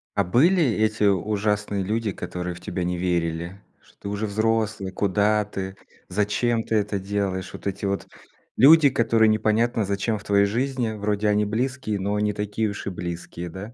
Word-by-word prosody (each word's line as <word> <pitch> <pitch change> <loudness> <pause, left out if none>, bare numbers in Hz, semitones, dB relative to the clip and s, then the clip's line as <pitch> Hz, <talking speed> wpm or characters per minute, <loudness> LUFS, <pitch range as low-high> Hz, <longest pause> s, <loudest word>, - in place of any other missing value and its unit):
А 100 - +3
были 165 - +4
эти 110 -4 +1
ужасные 105 +1 0
люди, 110 +1 -1
которые 90 0 -5
в 85 - -12
тебя 90 - -3
не 90 0 -1
верили? 85 +1 -2 0.2
Что - - -25
ты - - -6
уже 105 +1 -2
взрослый, 110 -2 0
куда 105 +2 +2
ты, 95 -2 -6 0.3
зачем 105 +4 0
ты 110 - -2
это 105 -1 0
делаешь? 95 -2 -2
Вот - - -10
эти 100 +1 -2 0.7
люди, 145 +3 +7
которые 115 -2 +3
непонятно 110 +1 +2
зачем 100 +2 -1
в 100 - -14
твоей 100 0 +3
жизни, 125 +2 -1
вроде 105 0 -1
они 105 0 +2
близкие, 110 -1 -2
но 100 +2 -1
не 105 0 +1
такие 105 +2 -2
уж 100 - -7
и 100 - -2
близкие, 85 0 -6
да. 100 +7 -8
105 Hz, 170 wpm, -24 LUFS, 95-110 Hz, 0.7 s, люди